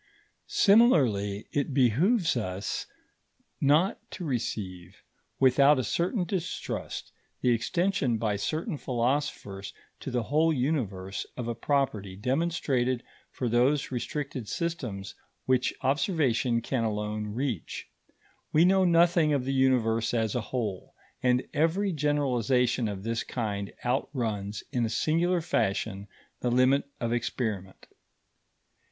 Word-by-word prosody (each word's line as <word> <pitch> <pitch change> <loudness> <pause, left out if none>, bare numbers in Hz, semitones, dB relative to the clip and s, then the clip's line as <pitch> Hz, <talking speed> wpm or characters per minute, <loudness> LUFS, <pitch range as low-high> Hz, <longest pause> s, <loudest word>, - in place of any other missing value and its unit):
Similarly, 130 - +4
it 140 -1 -1
behoves 160 - +3
us 100 -3 -3 0.7
not 150 +7 +3
to 180 - -6
receive 95 - -4 0.4
without 135 +2 +5
a 130 - 0
certain 180 - 0
distrust 180 0 -4 0.3
the 125 - +3
extension 170 - +1
by 110 -2 0
certain 155 - -2
philosophers 120 -6 -2 0.2
to - - -6
the 125 -1 -1
whole 155 +7 +2
Universe, 120 -10 -2
of 125 -2 -4
a 120 - -1
property 110 -9 -1
demonstrated 130 - 0 0.3
for 125 - -3
those 125 +5 +2
restricted 130 -2 -4
systems 125 - -3 0.3
which 130 -1 +2
observation 130 - +1
can 120 -1 -1
alone 105 -1 -2
reach. 125 - -3 0.6
We 160 +3 +5
know 190 +1 +4
nothing 170 -2 +4
of 135 -3 0
the 135 - -1
Universe 120 -4 +2
as 110 -3 0
a 125 - 0
whole, 110 -5 -4 0.3
and 125 0 +2
every 170 +7 +1
generalization 130 -5 +1
of 100 -2 -5
this 115 +1 -1
kind 100 -4 -3
outruns 115 -6 -2
in 120 - 0
a 115 - 0
singular 170 +8 +1
fashion 100 - -1 0.3
the 125 - 0
limit 130 +3 +3
of 115 0 -1
experiment. 110 -5 -3
125 Hz, 120 wpm, -28 LUFS, 110-150 Hz, 0.7 s, without